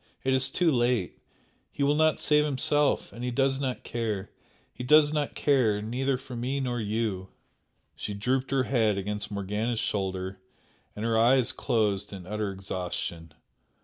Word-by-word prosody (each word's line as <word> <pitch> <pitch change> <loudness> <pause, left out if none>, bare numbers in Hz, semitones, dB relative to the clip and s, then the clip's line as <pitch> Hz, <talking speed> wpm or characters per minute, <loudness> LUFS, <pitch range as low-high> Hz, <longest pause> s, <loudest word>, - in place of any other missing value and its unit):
it 130 - +2
is 130 0 +3
too 175 -3 +2
late! 120 -7 0 0.5
He 140 - -2
will 140 +1 +4
not 155 +1 +3
save 150 -1 +3
himself 145 0 +1
and 120 - -7
he 125 - -1
does 135 +2 +1
not 130 -2 -3
care, 110 -5 -3 0.4
he - - -7
does 150 +3 +5
not 150 -2 -1
care 125 -8 +2
neither 125 +5 -1
for 130 -1 -9
me 130 +4 -2
nor 125 -2 -2
you!" 105 -3 -2 0.7
She 105 - -4
drooped 130 +6 0
her 135 -1 +2
head 110 -6 +1
against 105 +2 -3
Morgana's 105 +4 -2
shoulder 95 -3 -2 0.6
and 105 - -4
her 115 -1 +2
eyes 125 +2 +4
closed 105 -6 0
in 95 -3 -8
utter 105 +1 -2
exhaustion. 90 -4 -5
120 Hz, 160 wpm, -28 LUFS, 105-135 Hz, 0.7 s, does